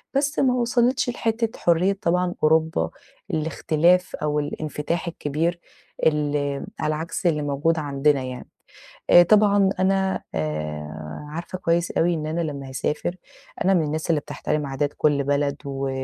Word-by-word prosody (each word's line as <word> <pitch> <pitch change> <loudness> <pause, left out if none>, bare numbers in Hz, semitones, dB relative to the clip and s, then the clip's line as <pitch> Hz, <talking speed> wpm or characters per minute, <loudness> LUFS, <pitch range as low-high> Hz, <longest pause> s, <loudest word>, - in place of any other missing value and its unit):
بس 285 +1 +1
ما 255 -2 +3
وصلتش 245 +2 +2
لحتة 230 -1 -2
حرية 180 +4 +2
طبعًا 180 +1 +1
أوروبا، 160 - +2 0.4
الاختلاف 160 +3 +2
أو 150 0 -1
الإنفتاح 150 +3 -3
الكبير، 165 +2 -2 0.5
ال 145 -2 0
على 155 0 0
عكس 165 +3 -5
اللي 150 -3 +1
موجود 145 +3 +1
عندنا 140 -1 +1
يعني، 125 -1 -7 0.6
آآ 175 - +9
طبعًا 200 +1 +4
أنا 190 0 +1
آآ 75 0 -4 0.3
عارفة 170 +4 -5
كويس 170 -1 +1
أوي 175 +1 +2
إن 155 -2 -3
أنا 160 +2 -2
لمّا 140 -4 -4
هاسافر، 150 +6 -2 0.5
أنا 195 - +4
من 175 - +3
الناس 155 +3 -3
اللي 155 -3 +3
بتحترم 150 0 -3
عادات 140 +1 -1
كُلّ 145 -2 +2
بلد، 140 0 +1
و 135 -1 -2
155 Hz, 140 wpm, -23 LUFS, 145-180 Hz, 0.6 s, آآ